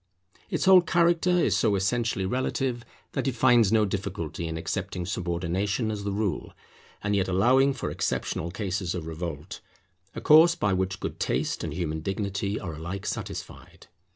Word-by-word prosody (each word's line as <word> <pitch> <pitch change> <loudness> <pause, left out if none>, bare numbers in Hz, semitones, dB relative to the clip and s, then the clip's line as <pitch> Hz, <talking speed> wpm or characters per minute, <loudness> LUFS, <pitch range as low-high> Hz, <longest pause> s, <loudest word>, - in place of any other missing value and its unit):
Its - - -1
whole 190 -1 +8
character 170 0 +2
is 180 -9 +3
so 105 0 +2
essentially 100 +1 0
relative, 125 +2 -1 0.3
that - - -2
it 130 - -1
finds 120 -4 +4
no 110 -1 +4
difficulty 95 -5 -4
in 80 0 -4
accepting 85 +2 -3
subordination 95 +5 -1
as 105 -1 -4
the 100 - -2
rule, 100 -4 -2 0.5
and 105 0 +1
yet 95 -1 +1
allowing 125 +9 +4
for - - -4
exceptional 85 - -2
cases 95 -1 -3
of 85 -3 -4
revolt; 80 +1 -6 0.5
a - - -3
course 160 +3 +6
by 105 - 0
which 95 0 -1
good - - -5
taste - - -1
and 75 -2 -4
human 80 -3 -2
dignity 100 +3 -2
are 90 -4 -5
alike 85 +5 -6
satisfied. - - -6
100 Hz, 160 wpm, -27 LUFS, 90-120 Hz, 0.5 s, whole